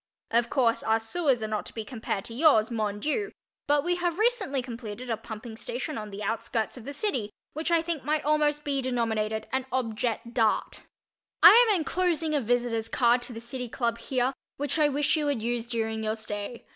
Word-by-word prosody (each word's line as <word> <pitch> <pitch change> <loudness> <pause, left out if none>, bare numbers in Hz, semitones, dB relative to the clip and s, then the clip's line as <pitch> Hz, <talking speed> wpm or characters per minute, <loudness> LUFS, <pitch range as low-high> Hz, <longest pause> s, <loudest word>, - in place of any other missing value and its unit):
Of 235 +1 +3
course, 235 -4 +2
our 225 0 +2
sewers 250 +1 0
are - - -1
not 215 -1 -2
to - - -11
be 220 -2 -4
compared 220 -5 -4
to 230 - -7
yours, 240 -5 +4
mon 210 -3 -1
Dieu, 360 - -1 0.4
but 290 0 +3
we 350 +1 +1
have 350 -1 -1
recently 415 - +1
completed 235 -1 -6
a - - +2
pumping 220 +1 -8
station 405 - -4
on 215 -1 -5
the 205 +1 -7
outskirts 225 +1 -2
of 245 -3 -11
the 280 - -5
city 285 - -1 0.2
which 315 +3 -2
I 335 -1 +3
think 330 -4 -3
might 300 +2 0
almost 300 0 +2
be 280 -2 0
denominated 220 -4 -1
an 265 0 0
objet 235 -1 -2
d'art. 225 -3 +1 0.6
I - - +13 0.2
am 420 - +5
enclosing 335 -2 0
a 290 - +2
visitor's 235 -1 0
card 240 0 +3
to 245 - -5
the 225 - -6
City 245 +1 -5
Club 235 -1 -1
here, 255 0 0 0.2
which 290 +2 -1
I 300 -1 +5
wish 290 +2 +1
you 300 -2 0
would 270 -7 -1
use 235 0 -1
during 225 -2 -2
your 215 0 0
stay. 215 +1 -5
245 Hz, 205 wpm, -27 LUFS, 225-295 Hz, 0.6 s, I